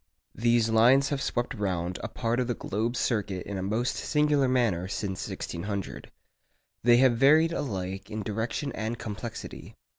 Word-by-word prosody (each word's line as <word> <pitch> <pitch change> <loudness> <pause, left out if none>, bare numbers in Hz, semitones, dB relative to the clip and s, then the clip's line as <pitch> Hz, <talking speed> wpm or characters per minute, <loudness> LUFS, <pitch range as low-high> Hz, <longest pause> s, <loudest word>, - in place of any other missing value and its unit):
These 115 -1 +2
lines 125 +5 +5
have 140 -2 -2
swept 120 0 -1
round 90 -5 -2
a - - -2
part 115 0 -1
of 125 - 0
the 120 - -1
globe's 115 +5 -2
circuit 105 -7 -1
in 100 -1 -4
a - - -3
most 110 +6 -1
singular 150 -2 +2
manner 115 -9 +1
since 95 -1 -3
1600. 100 +3 -5 0.7
They 120 +1 +6
have 125 -2 +4
varied 155 +6 +5
alike 95 - -4
in 105 0 -4
direction 115 +7 -2
and 110 0 -3
complexity. 110 +1 -7
115 Hz, 155 wpm, -28 LUFS, 100-125 Hz, 0.7 s, They